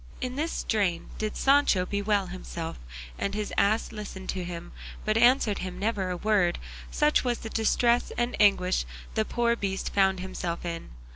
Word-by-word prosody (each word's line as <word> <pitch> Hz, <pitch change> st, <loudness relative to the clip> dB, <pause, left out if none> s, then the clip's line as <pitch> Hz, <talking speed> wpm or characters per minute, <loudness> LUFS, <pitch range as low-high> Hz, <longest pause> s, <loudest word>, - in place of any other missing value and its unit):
In 255 Hz, 0 st, -3 dB
this 315 Hz, +4 st, -1 dB
strain 195 Hz, -6 st, -1 dB
did 215 Hz, -1 st, -2 dB
Sancho 275 Hz, -10 st, +4 dB
bewail 200 Hz, 0 st, 0 dB
himself, 175 Hz, -2 st, -6 dB, 0.4 s
and 200 Hz, 0 st, -1 dB
his 210 Hz, -1 st, -3 dB
ass 215 Hz, +3 st, +2 dB
listened 205 Hz, -3 st, -7 dB
to 185 Hz, -, -2 dB
him, 175 Hz, 0 st, -7 dB, 0.3 s
but 215 Hz, -, +1 dB
answered 240 Hz, -2 st, +4 dB
him 180 Hz, -1 st, -5 dB
never 200 Hz, -2 st, -1 dB
a 180 Hz, -, -2 dB
word, 195 Hz, -3 st, +2 dB, 0.3 s
such 300 Hz, -1 st, +2 dB
was 245 Hz, -2 st, 0 dB
the 225 Hz, -, -8 dB
distress 235 Hz, +2 st, +2 dB
and 240 Hz, +1 st, 0 dB
anguish 195 Hz, -3 st, +4 dB, 0.3 s
the 220 Hz, -1 st, +1 dB
poor 235 Hz, +1 st, +1 dB
beast 195 Hz, -3 st, -3 dB
found 190 Hz, -1 st, +3 dB
himself 180 Hz, -2 st, -4 dB
in. 170 Hz, -1 st, -5 dB
205 Hz, 165 wpm, -27 LUFS, 185-230 Hz, 0.4 s, Sancho